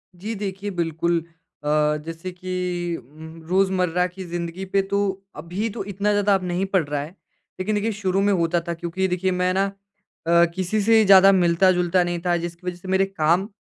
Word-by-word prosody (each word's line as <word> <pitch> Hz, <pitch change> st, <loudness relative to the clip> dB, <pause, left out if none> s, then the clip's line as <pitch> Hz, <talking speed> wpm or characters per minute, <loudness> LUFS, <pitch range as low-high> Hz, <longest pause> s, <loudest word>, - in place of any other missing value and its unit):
जी। 210 Hz, +6 st, -5 dB
देखिए, 200 Hz, 0 st, -4 dB
बिल्कुल 170 Hz, -1 st, -1 dB, 0.4 s
अ, -, -, -2 dB, 0.4 s
जैसे 165 Hz, +3 st, -6 dB
कि 180 Hz, -1 st, -3 dB
उम 160 Hz, +5 st, -12 dB
रोज़मर्रा 185 Hz, -2 st, +2 dB
की 185 Hz, +1 st, -9 dB
ज़िन्दगी 175 Hz, +2 st, -5 dB
पे 195 Hz, -, +4 dB
तो 200 Hz, -, +1 dB, 0.4 s
अभी 180 Hz, +8 st, -3 dB
तो -, -, -2 dB
इतना 205 Hz, +2 st, 0 dB
ज़्यादा 205 Hz, 0 st, +3 dB
अब 190 Hz, -, -2 dB
नहीं 180 Hz, +2 st, -1 dB
पड़ 185 Hz, -4 st, +4 dB
रहा 145 Hz, -1 st, -2 dB
है 150 Hz, -, -6 dB, 0.5 s
लेकिन 210 Hz, +3 st, -1 dB
देखिए 210 Hz, +2 st, 0 dB
शुरू 190 Hz, 0 st, +1 dB
में 205 Hz, 0 st, +3 dB
होता 170 Hz, -1 st, +1 dB
था 170 Hz, -, -1 dB
क्योंकि 175 Hz, +3 st, -2 dB
देखिए 185 Hz, +1 st, 0 dB
मैं 180 Hz, 0 st, +2 dB
ना 195 Hz, +1 st, +2 dB
अ, 195 Hz, -4 st, -1 dB
किसी 190 Hz, +3 st, -1 dB
से 220 Hz, +1 st, +5 dB
ज़्यादा 195 Hz, 0 st, +8 dB
मिलता-जुलता 180 Hz, 0 st, +3 dB
नहीं 175 Hz, 0 st, -2 dB
था। 175 Hz, -1 st, +2 dB
जिसकी 170 Hz, +1 st, -7 dB
वज़ह 175 Hz, -1 st, -3 dB
से 185 Hz, -, -12 dB
मेरे 190 Hz, +1 st, +2 dB
काम 180 Hz, 0 st, +1 dB
185 Hz, 190 wpm, -23 LUFS, 170-195 Hz, 0.5 s, ज़्यादा